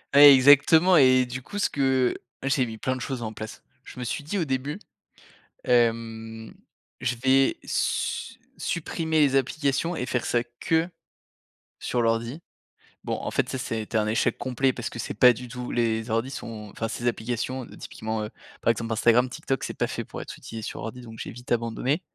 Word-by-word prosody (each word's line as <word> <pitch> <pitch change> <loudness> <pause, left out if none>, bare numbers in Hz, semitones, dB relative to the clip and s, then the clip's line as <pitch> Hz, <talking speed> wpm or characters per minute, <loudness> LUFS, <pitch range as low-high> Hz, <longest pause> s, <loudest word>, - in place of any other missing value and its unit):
Ouais, 145 0 +11
exactement 145 +7 +6
et 130 -3 +6
du 125 +1 -6
coup 205 - -8
ce 205 - +1
que 130 -2 +2 0.3
j'ai 135 -2 +1
mis 110 - -7
plein 130 +3 -1
de 130 - -7
choses 130 -4 -4
en 110 - -4
place. 110 0 -8 0.2
Je - - -12
me 125 - -3
suis 140 - -3
dit 180 +7 -3
au 170 - 0
début, 135 +3 -2 0.9
hem: 115 -2 0 0.5
«Je 125 - -1
vais 135 +2 +3
su - - -1 0.2
supprimer 160 -1 -1
les 135 -2 +4
applications 140 +5 0
et 125 - -2
faire 125 -1 -1
ça 120 -1 +1 0.2
que 165 +1 +1 0.9
sur 120 - -1
l'ordi». 115 +6 0 0.6
Bon, - - -2
en - - -4
fait, - - 0
ça - - -3
ça 125 -3 -3
a - - -1
été 110 +1 -2
un 105 -1 +1
échec 110 +1 +1
complet 130 0 +1
parce 120 -1 -5
que 120 - -9
c'est - - -4
pas 125 +4 +7
du 125 +1 -9
tout 125 0 -6
les 115 -1 0
ordis 115 +4 0
sont 110 -6 -7
enfin, 115 - -3
ces 120 +2 -3
applications 120 +2 -2
typiquement, 110 0 -4
heu, 105 - -5 0.3
par - - +4
exemple, 115 0 -3
Instagram, 120 +3 +4
TikTok, 135 -1 -3
c'est - - -5
pas - - +1
fait - - -4
pour - - -7
être - - -8
utilisé 115 0 -8
sur - - -6
ordi 115 +3 -6
donc 115 -2 -11
j'ai - - -5
vite 125 +1 -12
abandonné. 120 +6 0
125 Hz, 200 wpm, -26 LUFS, 115-135 Hz, 0.9 s, Ouais